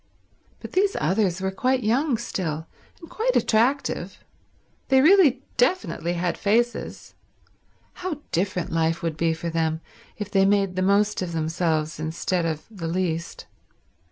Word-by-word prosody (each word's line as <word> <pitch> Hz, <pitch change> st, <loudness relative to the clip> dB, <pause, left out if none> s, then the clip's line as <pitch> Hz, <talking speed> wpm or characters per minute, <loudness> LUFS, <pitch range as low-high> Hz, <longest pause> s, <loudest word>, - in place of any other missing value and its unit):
But -, -, -8 dB
these 395 Hz, +1 st, +2 dB
others 185 Hz, +1 st, +1 dB
were 190 Hz, 0 st, -1 dB
quite 255 Hz, +5 st, 0 dB
young 245 Hz, +4 st, +2 dB
still, 165 Hz, -9 st, -3 dB, 0.3 s
and 335 Hz, -, -12 dB
quite 475 Hz, +7 st, -1 dB
attractive. 245 Hz, +6 st, +1 dB, 0.7 s
They 265 Hz, 0 st, +5 dB
really 295 Hz, -4 st, +5 dB
definitely 245 Hz, -, +1 dB
had 175 Hz, 0 st, -2 dB
faces. 235 Hz, +4 st, -1 dB, 0.9 s
How 345 Hz, -5 st, -4 dB
different 180 Hz, 0 st, -1 dB
life 165 Hz, 0 st, 0 dB
would 165 Hz, -2 st, -1 dB
be 165 Hz, 0 st, +1 dB
for 165 Hz, +1 st, -4 dB
them 160 Hz, -1 st, 0 dB, 0.4 s
if 210 Hz, -1 st, -5 dB
they 195 Hz, -1 st, +4 dB
made 195 Hz, -2 st, +2 dB
the 185 Hz, -, 0 dB
most 200 Hz, +2 st, +2 dB
of 175 Hz, -2 st, -3 dB
themselves 160 Hz, -1 st, -1 dB
instead 165 Hz, +2 st, -1 dB
of 155 Hz, -1 st, -4 dB
the 180 Hz, -6 st, -5 dB
least. 170 Hz, -1 st, -2 dB
190 Hz, 140 wpm, -24 LUFS, 165-240 Hz, 0.9 s, They